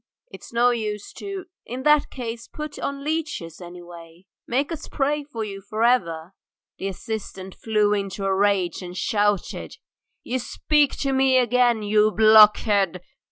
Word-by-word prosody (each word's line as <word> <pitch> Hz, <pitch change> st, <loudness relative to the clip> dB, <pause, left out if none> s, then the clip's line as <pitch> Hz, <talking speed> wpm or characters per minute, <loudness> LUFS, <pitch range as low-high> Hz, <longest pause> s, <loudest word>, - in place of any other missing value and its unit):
"It's -, -, -12 dB
no 240 Hz, +1 st, +3 dB
use 210 Hz, -3 st, -4 dB
to 390 Hz, -2 st, -6 dB
" -, -, -68 dB
"In 255 Hz, +2 st, -5 dB
that 300 Hz, 0 st, +4 dB
case 235 Hz, -2 st, -6 dB
put 300 Hz, -1 st, -7 dB
on 280 Hz, 0 st, -4 dB
leeches, 295 Hz, -, -4 dB
anyway! 175 Hz, 0 st, -12 dB, 0.2 s
Make 275 Hz, +6 st, 0 dB
us 320 Hz, -2 st, -6 dB
pray 295 Hz, +1 st, -1 dB
for 240 Hz, -6 st, -6 dB
you 195 Hz, -2 st, -7 dB
for 215 Hz, +3 st, -3 dB
ever." 175 Hz, -8 st, +1 dB, 0.5 s
The 195 Hz, -, -3 dB
assistant 195 Hz, -1 st, -6 dB
flew 210 Hz, -2 st, +1 dB
into 195 Hz, -1 st, -3 dB
a 195 Hz, -, +1 dB
rage 195 Hz, -2 st, +1 dB
and 180 Hz, 0 st, -8 dB
shouted: 205 Hz, -3 st, -1 dB, 0.5 s
"You 255 Hz, +1 st, -2 dB
speak 295 Hz, +3 st, +1 dB
to 275 Hz, -1 st, 0 dB
me 265 Hz, 0 st, +4 dB
again! 245 Hz, -2 st, +2 dB
You 210 Hz, +1 st, +3 dB
blockhead. 210 Hz, -4 st, +5 dB
215 Hz, 155 wpm, -23 LUFS, 195-260 Hz, 0.5 s, blockhead